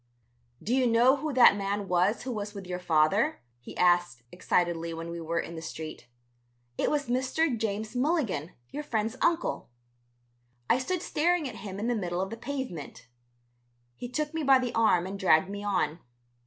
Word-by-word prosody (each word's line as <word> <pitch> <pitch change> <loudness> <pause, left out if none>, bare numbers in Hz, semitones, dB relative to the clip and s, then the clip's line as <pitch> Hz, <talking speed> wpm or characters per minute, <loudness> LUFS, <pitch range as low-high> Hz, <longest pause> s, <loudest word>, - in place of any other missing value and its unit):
"Do 235 - -1
you 260 -1 +3
know 240 +4 +5
who 305 +2 -3
that 250 -5 +7
man 200 0 -2
was 180 +5 +1
who 255 - -4
was 205 -2 -5
with 195 -2 -7
your 180 0 -4
father?" 180 - +2 0.2
he 120 - -11
asked 175 -9 +2
excitedly 170 -2 0
when 165 +1 -6
we 170 0 -5
were 165 +1 -1
in 170 - -5
the 160 - -6
street. 155 -5 -7 0.7
"It - - 0
was 290 -1 0
Mr. 260 +4 +1
James 220 +1 -3
Milligan, 245 - 0 0.2
your 295 - -4
friend's 225 -4 -2
uncle." 335 - 0 1.0
I 250 - +3
stood 360 +7 -2
staring 335 0 +1
at 230 -3 -8
him 195 -3 -7
in 215 - -2
the 240 - +1
middle 180 -5 -2
of 190 +2 -2
the - - -4
pavement. 240 - -6 0.9
He 245 - -7
took 300 +4 -2
me 320 - -2
by 270 -2 +6
the 250 -2 -2
arm 215 -6 +3
and 195 +1 -6
dragged 185 -1 +4
me 205 0 -5
on. 180 -6 0
210 Hz, 180 wpm, -28 LUFS, 175-260 Hz, 1.0 s, that